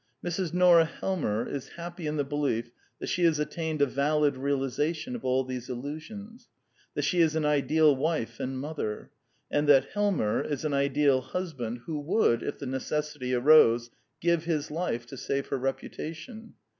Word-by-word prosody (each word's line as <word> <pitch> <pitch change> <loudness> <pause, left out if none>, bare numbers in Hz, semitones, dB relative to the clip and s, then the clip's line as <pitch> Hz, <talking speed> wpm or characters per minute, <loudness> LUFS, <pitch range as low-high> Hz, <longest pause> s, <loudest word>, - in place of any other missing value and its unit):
Mrs. 175 0 -2
Nora 175 -2 +6
Helmer 155 - -2
is 140 -2 -6
happy 170 -1 -6
in 150 +1 -2
the 145 - +1
belief 135 -5 -1 0.3
that - - -6
she 180 - -1
has 165 -2 +4
attained 155 0 -1
a - - +6
valid 145 +1 +1
realization 140 - -1
of 240 - -7
all 130 +1 +2
these 125 -1 -6
illusions; 160 - -7 0.5
that - - -1
she 180 - +1
is 160 -1 +3
an 155 -1 +1
ideal 150 +1 +4
wife 135 -6 -2
and 130 +1 -3
mother; 135 -6 -4 0.4
and 145 0 +1
that 135 -2 +6
Helmer 200 - +1
is 145 0 -3
an 150 - 0
ideal 140 -1 +3
husband 130 -6 -4
who 155 -3 -3
would, 145 - +2
if - - -4
the - - -7
necessity 130 -1 -2
arose, 120 -3 +5 0.3
give 170 -1 +1
his 155 -3 -1
life 150 -8 -2
to 130 +3 -10
save 140 +2 -2
her 140 - 0
reputation. 160 - -5
150 Hz, 170 wpm, -28 LUFS, 130-165 Hz, 0.5 s, Nora